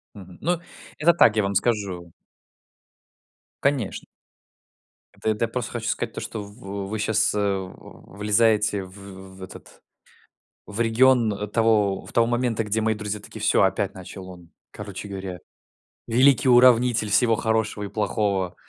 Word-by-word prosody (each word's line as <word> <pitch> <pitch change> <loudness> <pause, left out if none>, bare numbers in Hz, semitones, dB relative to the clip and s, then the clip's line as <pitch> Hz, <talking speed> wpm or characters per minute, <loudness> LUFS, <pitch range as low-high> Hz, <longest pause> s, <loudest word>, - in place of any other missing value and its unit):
Мгм. 95 -3 -12
Ну, 175 +1 0 0.4
это 170 +3 +4
так, 115 -9 +5
я 105 - +2
вам 100 0 -1
скажу. 95 -6 -1 1.5
Конечно! 135 -7 -1 1.1
Это - - -3
эт 110 -1 -2
я 115 - +2
просто 120 0 -4
хочу 115 -2 -4
сказать - - -2
то, - - -6
что 110 - -6
в 100 -2 -7
вы 110 +1 -4
сейчас, 105 -1 +1
э, 105 - -1
в 95 -1 -5
влезаете 105 -1 +2
в 95 0 -12
в 95 - -10
этот, 95 - -13 0.9
в 105 +2 -7
регион 115 -3 +2
того 110 -4 +2
в - - -12
того 115 -1 +3
момента, 120 -1 0
где 105 +1 -1
мои 110 0 +1
друзья 105 0 -5
такие: 110 +1 -11
"Всё, 105 - +3
опять 95 0 0
начал 95 0 -10
он, 90 -2 -13 0.2
короче 100 -1 -8
говоря, 95 -2 -6 0.7
великий 130 +2 +4
уравнитель 120 -3 +5
всего 115 +2 +3
хорошего 110 -2 -1
и - - -4
плохого". 100 -3 -1
105 Hz, 150 wpm, -24 LUFS, 100-115 Hz, 1.5 s, так